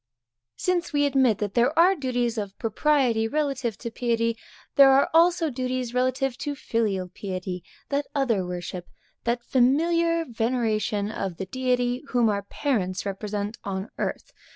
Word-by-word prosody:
_ - - -64 0.6
Since 355 -3 0
we 290 0 +3
admit 265 -6 +3
that 205 -2 -3
there 245 +5 +2
are 355 +3 +6
duties 245 -6 -1
of 200 -2 -6
propriety 230 -1 +2
relative 270 -5 -1
to 235 0 -6
piety, 230 -1 0 0.4
there 275 -1 +8
are 270 +1 +4
also 335 -1 +4
duties 255 -1 -3
relative 255 0 0
to 290 -1 -3
filial 210 -8 -1
piety, 185 -1 -5 0.3
that 280 0 -1
other 240 -9 +1
worship, 180 0 -6 0.4
that 240 +1 0
familiar 335 +7 +2
veneration 225 -4 -1
of 190 -5 -4
the 190 - -4
Deity, 250 +3 0
whom 240 -4 +2
our 200 -1 0
parents 200 -4 -2
represent 205 +2 -4
on 195 +1 -4
earth. - - -3
240 Hz, 150 wpm, -25 LUFS, 210-275 Hz, 0.6 s, there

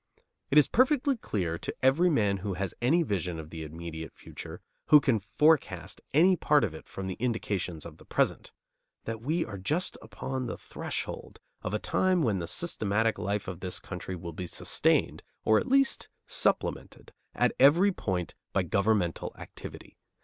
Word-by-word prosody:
It 145 - +3
is 150 - +7
perfectly 270 +2 +3
clear 90 - -2
to - - -5
every 150 +8 +5
man 105 - +2
who 95 0 -4
has 95 -1 -3
any 160 +8 +4
vision 90 - -2
of 80 0 -9
the 80 -1 -6
immediate 80 +1 -7
future, - - -9 0.3
who 150 - +9
can 130 -6 +2
forecast 150 +9 +1
any 180 +6 +5
part 150 -5 +3
of 95 -8 -1
it 80 - -11
from 95 - -6
the 95 - -3
indications 100 -9 -2
of - - -10
the - - -17
present, - - 0 0.5
that 115 -1 -5
we 160 +7 0
are 100 -3 -7
just 155 - -1
upon 130 -1 -4
the - - -4
threshold - - -5 0.2
of 105 - -2
a - - +2
time 185 - +1
when 105 -7 +1
the 85 - -4
systematic 110 - 0
life 100 0 -2
of 90 -2 -5
this 90 -1 -3
country 90 0 -6
will 85 -1 -7
be 90 +3 -5
sustained, - - +1 0.2
or 110 0 +5
at - - -4
least 275 +1 +2 0.2
supplemented, - - -1 0.2
at - - +2
every 165 +10 +6
point 90 - -3 0.2
by - - +2
governmental 100 -4 0
activity. - - -10
110 Hz, 170 wpm, -29 LUFS, 90-150 Hz, 0.5 s, who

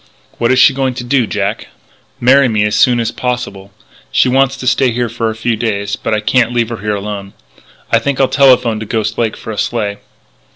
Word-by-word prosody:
"What 120 +1 +2
is 130 - +3
she 130 - +6
going 130 -1 -1
to 125 - -5
do, 120 -1 +1
Jack?" - - -3 0.5
"Marry 135 +2 +5
me 110 -3 +1
as 105 0 0
soon 120 +3 +3
as 115 0 -1
possible. 120 -7 -4 0.4
She 130 - +3
wants 135 +1 +2
to 130 - -7
stay 130 +1 +2
here 120 0 -2
for 115 0 -2
a 110 - -5
few 115 +1 -1
days 100 -2 -2
but - - -4
I 105 -1 +1
can't 120 +2 +2
leave 120 -2 0
her 115 - -5
here 105 +1 -2
alone. 100 -1 -6 0.6
I 115 - +4
think 140 +3 -2
I'll 135 - +4
telephone 125 -6 +3
to 110 - -7
Ghost 110 -1 -2
Lake 115 -2 -1
for 110 - -7
a 105 - -5
sleigh." 105 -4 -2
115 Hz, 220 wpm, -14 LUFS, 105-125 Hz, 0.6 s, she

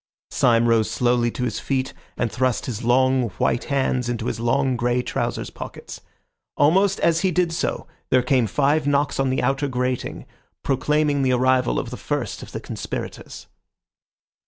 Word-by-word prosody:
Syme 120 -1 +3
rose 115 -2 +3
slowly 120 -1 +1
to 125 - -4
his 120 - -2
feet 135 -1 -2 0.2
and 120 -3 -1
thrust 130 -2 0
his 120 -2 -5
long, 130 0 +3
white 120 - 0
hands 130 -3 0
into 120 -2 -3
his 115 - -2
long, 130 +3 +1
grey 120 +1 0
trousers' - - -3
pockets. - - -9 0.6
Almost 190 +7 +3
as 165 -1 +3
he 190 - +2
did 175 -1 +1
so 165 - -2 0.2
there 130 -1 +3
came 125 -2 +2
five 145 +6 +1
knocks 145 0 +1
on 135 -1 +2
the 130 - 0
outer 135 +1 +1
grating, 125 -1 -3 0.4
proclaiming 145 +2 +1
the 130 -1 +2
arrival 130 0 +2
of 120 - -3
the 125 - -6
first 145 -8 -3
of - - -10
the - - -5
conspirators. - - -6
130 Hz, 165 wpm, -22 LUFS, 120-140 Hz, 0.6 s, Syme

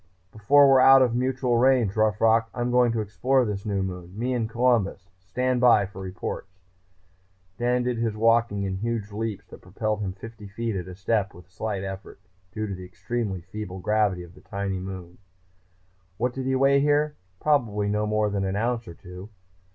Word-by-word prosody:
"Before 140 +7 +5
we're 135 -1 +6
out 135 +1 +8
of 120 -2 +1
mutual 125 -1 0
range, 125 -5 +3
Rough 110 -1 +2
Rock, 115 0 +3
I'm 120 0 -1
going 125 -1 +4
to 115 - -1
explore 125 +6 +1
this 105 -1 -4
new 100 -2 0
moon. 90 0 -7
Me 125 +3 -1
and 115 -3 -1
Columbus! 115 -6 0
Stand 125 +7 -1
by 115 -5 +5
for 95 0 -10
reports." 95 0 -7 1.0
Dan 125 +1 +1
did 125 -1 -1
his 115 -2 -1
walking 115 -2 +2
in 95 -1 -2
huge 110 0 -3
leaps 105 -1 -4
that - - -12
propelled 105 +3 -3
him 95 -2 -3
fifty 110 +1 -11
feet 115 +2 -3
at 90 -1 -4
a 90 - -8
step 100 0 -1
with 90 +1 -16
slight 100 0 -4
effort, 95 0 -7 0.3
due 110 +3 -3
to 100 - -4
the 90 0 -8
extremely 95 +1 -4
feeble 95 +1 -7
gravity 100 -2 0
of 85 0 -14
the - - -17
tiny 100 -1 -4
body. 90 -1 -8 1.0
What 125 +2 -1
did 130 0 -4
he 130 - +1
weigh 135 +1 +4
here? 150 +1 +2 0.2
Probably 115 -9 +1
no 105 +1 0
more 105 -1 +1
than 100 -1 -1
an 95 0 -2
ounce 115 +1 -1
or 85 - -9
two. 90 +3 -11
110 Hz, 190 wpm, -25 LUFS, 95-120 Hz, 1.0 s, out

